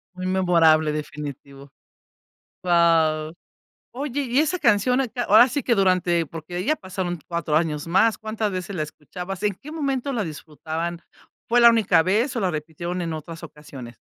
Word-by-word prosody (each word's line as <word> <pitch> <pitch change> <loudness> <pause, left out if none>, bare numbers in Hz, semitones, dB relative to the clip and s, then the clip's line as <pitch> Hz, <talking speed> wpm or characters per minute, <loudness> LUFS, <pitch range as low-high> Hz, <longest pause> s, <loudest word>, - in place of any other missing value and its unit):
Muy 185 0 -6
memorable, 170 -4 +3
definitivo. 145 -2 -7 0.9
Guau. 165 -3 +2 0.6
Oye, 285 +1 -3
¿y 255 +1 +1
esa 315 +4 +1
canción 240 +4 +3
a 265 - -1
qué? 245 +2 -5
Ahora 230 +3 +6
sí 270 +3 -2
que 235 - +2
durante 180 -3 +2
porque 165 +3 -9
ahí 180 +2 -3
ya 310 - +2
pasaron 185 - -5
4 170 -3 -2
años 155 -1 0
más. 220 +6 +3
¿Cuántas 215 -1 -3
veces 185 +1 -5
la 155 - -1
escuchabas? 180 +6 -8
¿En 205 -1 +1
qué 300 +10 -12
momento 275 -3 -2
la 225 -4 -1
disfrutaban? 160 +2 -6 0.5
¿Fue 240 +1 +3
la 235 - +9
única 210 -7 +3
vez 220 - 0
o - - 0
la 190 -4 0
repitieron 170 +3 -5
en 165 -2 -3
otras 165 +2 -8
ocasiones? 140 -7 -11
180 Hz, 170 wpm, -23 LUFS, 160-220 Hz, 0.9 s, la